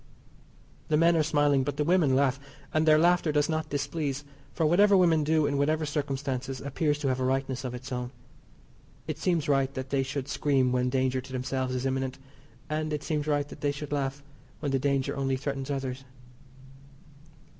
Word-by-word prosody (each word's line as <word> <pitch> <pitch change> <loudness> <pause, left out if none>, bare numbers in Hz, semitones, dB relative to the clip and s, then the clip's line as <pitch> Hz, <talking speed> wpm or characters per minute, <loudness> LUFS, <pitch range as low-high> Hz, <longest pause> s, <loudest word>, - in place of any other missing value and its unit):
The 150 - +2
men 170 +2 +4
are 160 - +4
smiling, 145 -3 +2
but 145 +2 -3
the 150 - +1
women 160 -5 +3
laugh, 135 -1 +2 0.3
and 155 0 +2
their 155 0 +7
laughter 175 0 +3
does 150 0 +2
not 160 -1 -2
displease, 145 0 -2 0.3
for 165 - 0
whatever 200 +5 +5
women 165 -4 +4
do 155 0 +2
in 140 -1 0
whatever 155 +2 +1
circumstances 135 -3 -3
appears 145 +2 -1
to 150 -2 -2
have 130 0 0
a - - -1
rightness 130 0 -1
of 125 -1 -4
its 130 +2 -9
own. 125 -1 -3 1.0
It 155 -1 -5
seems 170 -3 0
right 135 -2 +2
that 130 0 -5
they 140 -1 +2
should 135 0 -3
scream 135 -4 +1
when 125 0 +1
danger 130 0 0
to 130 +1 -13
themselves 130 0 -2
is 125 +1 -2
imminent, 130 0 -1 0.5
and 155 +1 -2
it 150 -1 -2
seems 150 -2 -2
right 145 -1 +1
that - - -11
they 145 - +1
should 145 0 -7
laugh 140 0 -2 0.4
when 145 -3 -2
the 135 - +1
danger 135 0 0
only 135 -1 0
threatens 135 0 -4
others. 135 -1 -3
140 Hz, 190 wpm, -28 LUFS, 130-155 Hz, 1.0 s, their